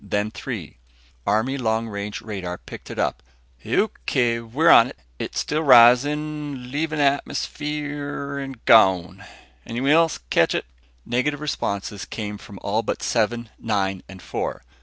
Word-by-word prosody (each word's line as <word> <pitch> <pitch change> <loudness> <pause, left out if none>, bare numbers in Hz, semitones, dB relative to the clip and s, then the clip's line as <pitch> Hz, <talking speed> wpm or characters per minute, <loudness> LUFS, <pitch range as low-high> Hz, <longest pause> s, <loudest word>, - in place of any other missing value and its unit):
Then 105 +1 -1
Three, 105 - -7 0.5
Army 110 +7 +1
long 110 -1 0
range 100 -1 -5
radar, 95 -5 -5
picked - - -11
it - - -7
up. 60 - -1 0.4
"O.K., 115 - 0
we're 120 +8 +3
on. 115 +3 +7 0.3
It's - - -3
still 155 +1 -1
rising... 140 +1 +4
leaving 155 +2 -1
the 145 - +3
atmosphere... 145 -1 -3
gone. 95 -3 +5 0.4
Anyone 125 - -1
else 165 +1 +4
catch - - +3
it?" - - -1 0.4
Negative 130 +4 0
responses 100 -9 -3
came 105 -2 -5
from 105 -4 -11
all 105 +3 +1
but 115 - -3
Seven, 120 0 0
Nine 95 -4 -1
and 95 -1 -11
Four. - - -4
120 Hz, 135 wpm, -23 LUFS, 105-145 Hz, 0.5 s, on